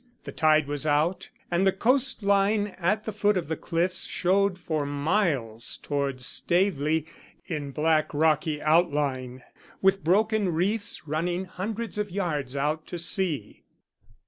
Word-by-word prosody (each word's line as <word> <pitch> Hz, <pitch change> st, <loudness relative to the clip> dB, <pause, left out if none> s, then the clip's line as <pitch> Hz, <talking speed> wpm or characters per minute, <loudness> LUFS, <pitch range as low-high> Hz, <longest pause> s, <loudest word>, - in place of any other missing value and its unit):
The -, -, -7 dB
tide 155 Hz, -1 st, +3 dB
was 145 Hz, +1 st, -2 dB
out, 155 Hz, +5 st, +1 dB, 0.2 s
and 175 Hz, +1 st, +2 dB
the -, -, +5 dB
coastline 205 Hz, -3 st, +2 dB
at 200 Hz, +5 st, 0 dB
the 220 Hz, -, -3 dB
foot 210 Hz, -1 st, +1 dB
of 175 Hz, -, -3 dB
the 160 Hz, -, 0 dB
cliffs 175 Hz, +3 st, -1 dB
showed 190 Hz, +1 st, +1 dB
for 160 Hz, -4 st, -2 dB
miles 145 Hz, -, -1 dB
towards 140 Hz, -3 st, -3 dB
Staveley 160 Hz, -4 st, +1 dB, 0.4 s
in 150 Hz, -4 st, -4 dB
black 155 Hz, +2 st, +1 dB
rocky 155 Hz, 0 st, +1 dB
outline, 145 Hz, -6 st, +1 dB, 0.4 s
with 195 Hz, 0 st, +2 dB
broken 210 Hz, +3 st, +2 dB
reefs 200 Hz, 0 st, 0 dB
running 175 Hz, +5 st, -1 dB
hundreds 210 Hz, +3 st, -5 dB
of 210 Hz, -1 st, -2 dB
yards 155 Hz, -8 st, -2 dB
out 150 Hz, +3 st, -1 dB
to 175 Hz, -, -5 dB
sea. 170 Hz, -2 st, -2 dB
170 Hz, 135 wpm, -26 LUFS, 150-195 Hz, 0.4 s, the